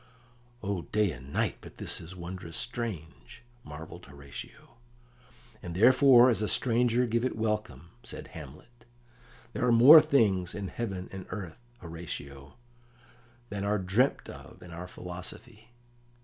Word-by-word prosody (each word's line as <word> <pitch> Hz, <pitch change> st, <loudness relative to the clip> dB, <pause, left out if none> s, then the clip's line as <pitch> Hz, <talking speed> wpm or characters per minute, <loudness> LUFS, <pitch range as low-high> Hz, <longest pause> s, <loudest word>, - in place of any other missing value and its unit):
"O 100 Hz, -3 st, -2 dB
day 105 Hz, +1 st, 0 dB
and 65 Hz, 0 st, -11 dB
night, -, -, -1 dB
but -, -, -13 dB
this -, -, -4 dB
is 85 Hz, +3 st, -10 dB
wondrous 85 Hz, -2 st, -7 dB
strange!" 115 Hz, -4 st, -5 dB, 0.2 s
marvelled 75 Hz, 0 st, -10 dB
Horatio. 70 Hz, +7 st, -11 dB, 0.8 s
"And 85 Hz, -1 st, -7 dB
therefore 125 Hz, +3 st, +7 dB
as 110 Hz, -, -1 dB
a 105 Hz, -, 0 dB
stranger 120 Hz, +1 st, +2 dB
give 115 Hz, 0 st, 0 dB
it 130 Hz, -, -1 dB
welcome," 105 Hz, -9 st, -3 dB
said -, -, -8 dB
Hamlet. 115 Hz, -, -13 dB, 0.7 s
"There -, -, -3 dB
are 125 Hz, -, +3 dB
more 135 Hz, +7 st, +10 dB
things 105 Hz, -, +1 dB
in 100 Hz, -2 st, -4 dB
heaven 95 Hz, -6 st, -5 dB
and 95 Hz, -1 st, -8 dB
earth, 105 Hz, +4 st, -8 dB
Horatio, 70 Hz, -5 st, -8 dB, 0.9 s
than 100 Hz, -1 st, -4 dB
are 105 Hz, +1 st, +1 dB
dreamt 100 Hz, +8 st, +1 dB
of -, -, -12 dB
in 90 Hz, -, -12 dB
our 85 Hz, +2 st, -7 dB
philosophy." 95 Hz, +6 st, -9 dB
100 Hz, 135 wpm, -29 LUFS, 85-120 Hz, 0.9 s, more